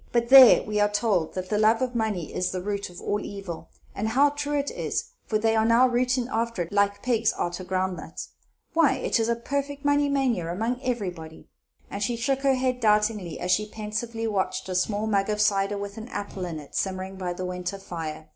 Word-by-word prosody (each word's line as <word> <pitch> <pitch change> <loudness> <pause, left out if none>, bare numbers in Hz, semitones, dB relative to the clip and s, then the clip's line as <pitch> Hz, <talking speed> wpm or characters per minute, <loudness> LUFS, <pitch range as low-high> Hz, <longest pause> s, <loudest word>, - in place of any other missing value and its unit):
But 235 0 +1
there, 260 -2 +9
we 210 0 -2
are 205 0 +3
told 205 -6 0
that 185 0 -4
the 210 - +1
love 220 +1 +4
of 255 -1 -1
money 215 -8 -2
is 180 0 -1
the 185 - -3
root 200 -1 -3
of 175 - -11
all 205 - -1
evil, 195 -6 -7 0.2
and 215 - -2
how 275 +6 +4
true 290 0 -2
it 285 0 -1
is! 470 +1 -3 0.2
for 215 - +1
they 225 +1 +1
are 220 - +3
now 230 +3 +5
rooting 250 0 +1
arter 230 -5 -1
it, 165 - -11
like 200 0 +1
pigs 230 -3 +2
arter 175 +1 -3
ground 185 0 -1
nuts. - - -8 0.4
Why, 320 -5 +4
it 255 - 0
is 225 0 +1
a 235 - +2
perfect 280 +4 -4
money 285 0 +3
mania 255 -11 0
among 230 +7 -2
everybody!" 180 -11 -5 0.4
And 200 - -5
she 235 +4 0
shook 265 +4 0
her 275 -1 +3
head 255 -1 0
doubtingly, 210 -5 +1
as 180 - -1
she 210 +3 +1
pensively 220 +2 -4
watched 200 -4 -1
a - - -2
small 205 +4 0
mug 200 -2 +1
of 210 0 -1
cider, 205 -1 +2
with 200 +1 -6
an 220 - -8
apple 200 -6 -5
in 165 -2 -5
it, 150 -2 -11
simmering 190 0 -3
by 180 -2 -3
the 185 +1 -5
winter 180 +2 -4
fire. 160 -4 -6
210 Hz, 220 wpm, -26 LUFS, 190-245 Hz, 0.4 s, there